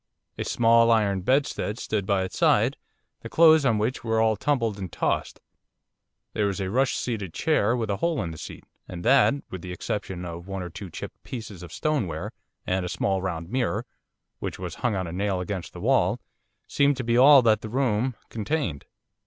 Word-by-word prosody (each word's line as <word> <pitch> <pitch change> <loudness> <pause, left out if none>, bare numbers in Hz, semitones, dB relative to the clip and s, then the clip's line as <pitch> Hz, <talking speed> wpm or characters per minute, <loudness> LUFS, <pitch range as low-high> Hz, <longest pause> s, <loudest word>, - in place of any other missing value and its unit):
A - - 0
small 115 0 +4
iron 100 -4 +2
bedstead 130 -1 0
stood 105 -5 -2
by 100 -2 +2
its 95 - -6
side, - - +3 0.5
the - - -8
clothes 160 -3 +6
on 115 -4 +2
which 110 +5 -1
were 110 -1 +1
all 110 -1 +3
tumbled 115 -4 0
and 95 -4 -5
tossed. - - -1 0.9
There 105 - +1
was 100 0 -3
a 95 -1 -2
rush 130 +4 +2
seated 105 -8 -4
chair 125 -8 +2
with 110 -3 -2
a 100 - -1
hole 170 - 0
in 85 - -4
the 80 - -9
seat, - - -9 0.2
and 85 -1 -7
that, 135 +2 +5 0.2
with 95 - -6
the 90 - -7
exception 90 0 -4
of 85 +1 -7
one 95 -1 -4
or 90 - -7
two 95 +2 -8
chipped - - -8
pieces 110 -7 -8
of 85 -2 -10
stoneware, 105 - -2 0.3
and 95 0 0
a 90 - -3
small 95 +1 0
round 85 -1 -4
mirror 120 -3 -1 0.5
which - - -4
was 90 -2 -6
hung 120 -4 +1
on 95 -1 -2
a 85 - -6
nail 95 0 -1
against 90 0 -4
the - - -10
wall, - - +2 0.5
seemed 140 -1 +2
to 130 - -3
be 115 0 +1
all 135 +1 +8
that 110 -2 +3
the 110 - -6
room 125 -1 0
contained. 110 - -2
105 Hz, 200 wpm, -25 LUFS, 95-125 Hz, 0.9 s, all